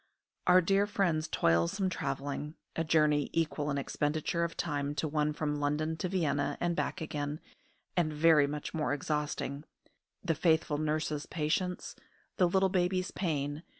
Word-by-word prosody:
Our 180 +1 +7
dear 195 +3 +2
friend's 175 -6 +1
toilsome 85 - +2
travelling 145 0 -3 0.2
a 165 - 0
journey 150 -2 +3
equal 155 -2 0
in 140 - 0
expenditure 150 +4 -1
of 170 0 -3
time 145 -2 -2
to 155 - -1
one 150 0 +1
from 150 -1 -2
London 150 +2 0
to 180 - -2
Vienna 150 -6 0
and 175 -1 0
back 180 - -2
again, 150 -1 -3 0.6
and 170 -4 +2
very 150 -1 +5
much 150 +1 -5
more 150 -3 0
exhausting, 150 -1 -2 0.6
the 170 -3 +1
faithful 160 -2 +2
nurse's 155 -1 -1
patience, 170 +3 -2 0.4
the 180 -3 +4
little 190 +1 +3
baby's 185 0 0
pain! 145 -4 -2
155 Hz, 150 wpm, -31 LUFS, 145-170 Hz, 0.6 s, Our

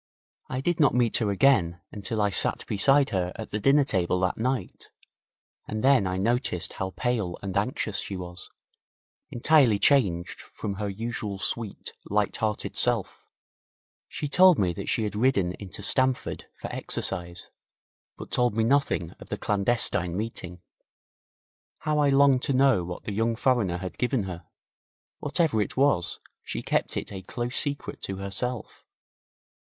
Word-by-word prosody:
I 130 - -3
did 175 +3 0
not 145 -5 +4
meet 120 -3 +3
her 110 -3 0
again 95 -6 +3
until 105 +1 -3
I 105 - +1
sat - - 0
beside 135 +7 +3
her 90 -2 -1
at 110 - -8
the 105 - -2
dinner 140 +6 +4
table 90 -7 0
that 90 - +1
night, 130 +3 -3 0.8
and 110 0 -4
then 130 -7 +4
I 95 0 -2
noticed 95 -3 0
how 95 0 -5
pale 110 -8 -1
and 95 -2 -4
anxious 105 -1 -1
she 95 - -5
was, 90 0 -8 0.8
entirely 125 -4 +4
changed 100 -7 +2
from 100 -2 -6
her 105 - -1
usual 105 -1 -4
sweet, 105 +1 -4 0.2
light 105 0 0
hearted 110 -1 -2
self. 120 -5 0 0.8
She 150 - -4
told 180 +3 +6
me 90 -3 +1
that - - -6
she 110 - +1
had 105 -1 -3
ridden 105 -6 +2
into 100 0 -7
Stamford 130 +4 +2
for - - -6
exercise, 85 -2 -3 0.7
but - - -9
told 120 -3 +1
me 110 - +2
nothing 125 - +1
of - - -13
the - - -3
clandestine 100 -4 +1
meeting. 90 -5 -6 1.1
How 150 -1 -1
I 145 -1 +4
longed 135 -2 +5
to 140 - 0
know 130 -7 +4
what 90 0 -7
the 105 - -4
young 115 +2 0
foreigner 110 -8 +1
had 95 +1 -7
given 125 -2 +1
her. 90 -3 -7 0.7
Whatever 150 -6 +1
it 105 - -4
was, 130 -11 +2 0.2
she - - -5
kept - - -1
it - - -4
a 95 -2 -6
close 120 +6 -4
secret 145 -2 -3
to 95 - -4
herself. 100 +5 -4
110 Hz, 155 wpm, -26 LUFS, 95-130 Hz, 1.1 s, told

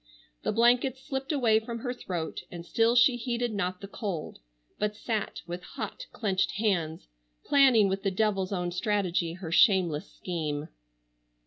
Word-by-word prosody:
The - - 0
blankets 245 +4 +3
slipped 270 +1 -3
away 235 -7 +3
from 230 +1 -6
her 245 0 -2
throat 175 -9 -4
and 170 -1 -8
still 230 +6 +2
she 245 0 +5
heeded 240 -1 -2
not 185 -2 -2
the 200 - -7
cold, 195 -6 -5 0.4
but 210 0 0
sat 220 -1 -3
with 175 +1 -5
hot - - -7
clenched 190 -4 0
hands 175 -7 -1 0.4
planning 260 -7 +5
with 195 0 -1
the 195 - +1
devil's 195 -1 0
own 180 -2 -1
strategy 180 -3 0
her 175 -2 -7
shameless 180 - +3
scheme. 155 -4 -4
205 Hz, 150 wpm, -28 LUFS, 180-235 Hz, 0.4 s, she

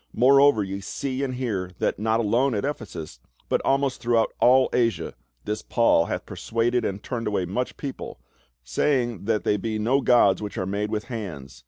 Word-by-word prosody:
More 135 +3 +6
over 140 -7 +5
ye 95 0 -5
see 130 +6 -4
and 130 -2 -2
hear, 105 -8 -2
that - - -1
not 110 +1 +1
alone 120 +4 +1
at 105 - -1
Ephesus, 95 - -6 0.3
but - - +1
almo.st 135 -1 +1
throughout 115 -1 +1
all 130 +1 +5
A.sia, 115 -2 0 0.3
this 105 +1 -3
Paul 115 -8 +3
hath - - -4
persuaded 120 +2 -1
and 100 +1 -3
turned 120 -3 -4
away 100 -3 0
much 125 +8 -3
people, 140 -2 -7 0.4
saying 120 - 0
that 110 -1 0
they 105 - +1
be 110 0 -3
no 120 +6 +1
gods 120 -7 +4
which 105 -1 -6
arc 95 - -2
made 105 +1 -2
with 105 0 -2
hands. 85 - -7
115 Hz, 185 wpm, -24 LUFS, 100-125 Hz, 0.4 s, More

